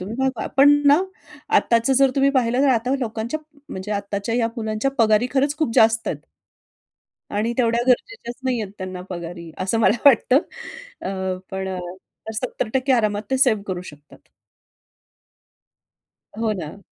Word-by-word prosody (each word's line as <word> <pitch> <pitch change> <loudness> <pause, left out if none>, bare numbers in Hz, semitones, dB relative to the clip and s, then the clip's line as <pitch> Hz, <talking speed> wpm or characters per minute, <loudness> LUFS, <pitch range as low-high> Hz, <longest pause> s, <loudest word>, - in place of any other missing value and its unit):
तुम्ही 195 +5 -6
भागवा. 265 -4 -1
पण 285 +1 +8 0.2
ना 290 +4 +6 0.6
आत्ताच 230 +2 +2
जर 270 -1 +5
तुम्ही 275 0 +4
पाहिलं 250 -1 +1
ना, 285 - +4
तर 265 - +5
आता 250 +3 0
लोकांच्या 235 +5 -3 0.3
म्हणजे 190 +3 -5
आत्ताच्या 200 +2 -3
या 230 -2 +1
मुलांच्या 220 +3 -1
पगारी 220 +1 +4
खरंच 280 +2 +1
खूप 310 -7 0
जास्त 225 0 +4
आहेत. - - -2 1.2
आणि 220 +3 0
तेवढ्या 235 -1 +2
गरजेच्याचं 250 - -1
नाही 245 -3 0
आहे 195 -2 -6
त्यांना 185 -1 -6
पगारी 170 -1 -7
असं 195 +5 0
मला 215 +1 +3
वाटतं. 260 0 +6 0.6
अ, 190 -1 -3
पण 190 0 -3
अ, 185 -1 -4 0.5
70% 255 +3 -1
आरामात 210 -3 +1
ते 265 - +2
सेव्ह 235 -6 +3
करू 180 -2 -3
शकतात. 150 -4 -14 2.2
हो 225 -1 +1
ना. 155 +3 -7
225 Hz, 150 wpm, -22 LUFS, 195-255 Hz, 2.2 s, पण